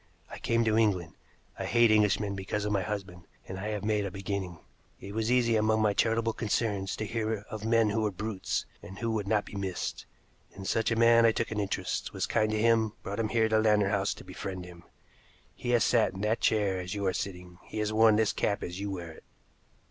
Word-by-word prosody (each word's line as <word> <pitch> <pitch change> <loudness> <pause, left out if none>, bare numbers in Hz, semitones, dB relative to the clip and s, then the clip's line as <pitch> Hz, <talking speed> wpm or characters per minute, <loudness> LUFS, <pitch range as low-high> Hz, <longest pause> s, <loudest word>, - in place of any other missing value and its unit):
I - - -8
came 115 0 +1
to 110 -1 +2
England. 90 -7 +1 0.5
I - - -2
hate 120 -1 +4
Englishmen 105 -1 +3
because 100 +2 -3
of 105 - -1
my 100 -2 +1
husband, 95 -3 -5 0.2
and 95 0 -6
I 105 - -4
have 105 -2 -3
made 105 -1 +1
a 100 - -2
beginning. 95 -2 -4 0.4
It 100 - -8
was 110 +2 0
easy 120 -2 +3
among 110 0 +2
my 105 -1 +3
charitable 115 +2 +1
concerns 105 -3 -1
to 110 - -4
hear 110 -1 -2
of 110 0 -6
men 115 -2 +3
who 110 +2 0
were 105 - +1
brutes, 100 0 -3 0.2
and 95 - -10
who 115 +1 -2
would 105 -3 -2
not 105 0 +1
be - - -12
missed. 95 -2 -4 0.5
In 95 - -8
such 115 +3 +1
a 115 - +1
man 115 0 +6
I 115 - +6
took 115 +1 -2
an 105 - -2
interest, 95 -2 -2
was - - -1
kind 110 -1 +1
to 110 0 0
him, 115 -1 +3
brought 100 +2 -4
him 110 -1 0
here 115 -1 +2
to 110 0 +3
Lantern 105 -2 +3
House 100 -1 0
to - - -12
befriend 95 -2 -6
him. 90 -1 -13 0.7
He 120 - -6
has 120 -3 +4
sat 115 -5 +3
in 95 - -6
that 110 +2 0
chair 100 -4 +2
as 90 +3 -5
you 100 -1 -2
are 95 - +1
sitting, 90 -2 -6
he - - -8
has 105 0 -1
worn 110 0 +6
this 110 0 +2
cap 100 - -1
as 90 +1 -5
you 100 0 -3
wear 85 -4 -5
it. 80 - -15
105 Hz, 230 wpm, -29 LUFS, 95-110 Hz, 0.7 s, man